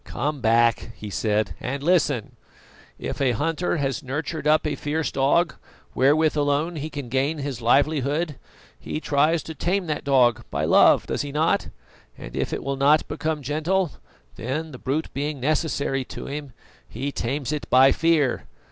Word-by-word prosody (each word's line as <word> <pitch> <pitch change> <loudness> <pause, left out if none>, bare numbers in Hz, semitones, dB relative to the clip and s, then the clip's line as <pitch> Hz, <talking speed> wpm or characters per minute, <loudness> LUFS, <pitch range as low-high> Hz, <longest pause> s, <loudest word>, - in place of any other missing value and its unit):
"Come 145 +1 -3
back," 115 0 +2
he 105 +2 -8
said, 105 +1 0
"and 135 +3 -4
listen: 150 - +1 0.6
If - - -5
a 130 -3 +3
hunter 165 +8 -1
has 140 -1 -1
nurtured 150 +2 -4
up 155 +1 +4
a 150 - 0
fierce 150 +3 -2
dog, 140 +6 +2 0.4
wherewith 150 +4 +3
alone 145 +3 0
he 155 +1 -4
can 145 -4 -6
gain 135 +6 0
his 140 -4 -4
livelihood, 145 +4 +1 0.4
he 70 - -4
tries 155 +2 +2
to 160 - -7
tame 180 +5 -1
that 155 -2 -3
dog 125 -5 +3
by - - -1
love, - - +5
does - - -2
he 145 -1 -5
not? 155 +3 +1 0.5
And - - -9
if - - -1
it - - -3
will 135 0 -2
not 145 +3 +4
become 155 0 -3
gentle, 160 +5 0 0.5
then, 150 +7 -3
the 130 - -10
brute 150 +5 -2
being 145 +1 -3
necessary 140 -1 0
to - - -8
him, 145 -1 -6 0.4
he 140 +1 -4
tames 135 +3 -3
it 150 -1 -4
by 130 +2 +6
fear. 160 -6 +1
145 Hz, 165 wpm, -24 LUFS, 135-155 Hz, 0.6 s, by